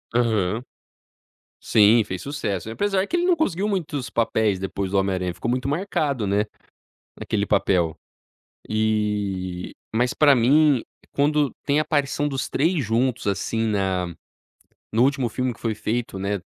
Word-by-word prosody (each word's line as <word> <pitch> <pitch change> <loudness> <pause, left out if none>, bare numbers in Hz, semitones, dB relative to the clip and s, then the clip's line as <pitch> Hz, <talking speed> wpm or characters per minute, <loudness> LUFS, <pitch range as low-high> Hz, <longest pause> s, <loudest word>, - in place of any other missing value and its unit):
Aham. 110 -2 +1 1.0
Sim, 110 +2 +5
fez 95 -3 -5
sucesso, 110 - -3
apesar 195 - 0
que - - -1
ele 350 0 +1
não 360 -1 +4
conseguiu 205 - 0
muitos 160 -10 -2
papéis 110 -4 +1
depois 95 0 -3
do 100 - +1
Homem 95 0 +1
Aranha, 90 -1 -2
ficou 115 - -4
muito 125 +2 -1
marcado, 145 - -1
né, 100 +2 +2 0.7
naquele - - -1
papel. 85 -4 +1 0.7
Eh, 105 -4 -1 0.2
mas 120 +2 +2
pra 145 -2 +5
mim, 140 +2 +4 0.3
quando 145 0 +2
tem 145 +1 +2
a - - +2
aparição 145 -1 0
dos 135 -2 -3
3 160 +1 +1
juntos, 120 +2 0
assim, 110 +3 -1
na 95 -4 -1 0.8
no 115 - +4
último 135 -2 +1
filme 125 +2 -2
que - - -21
foi 115 -2 -1
feito, 115 0 -3
né, 100 +1 -1
115 Hz, 150 wpm, -23 LUFS, 100-145 Hz, 1.0 s, Sim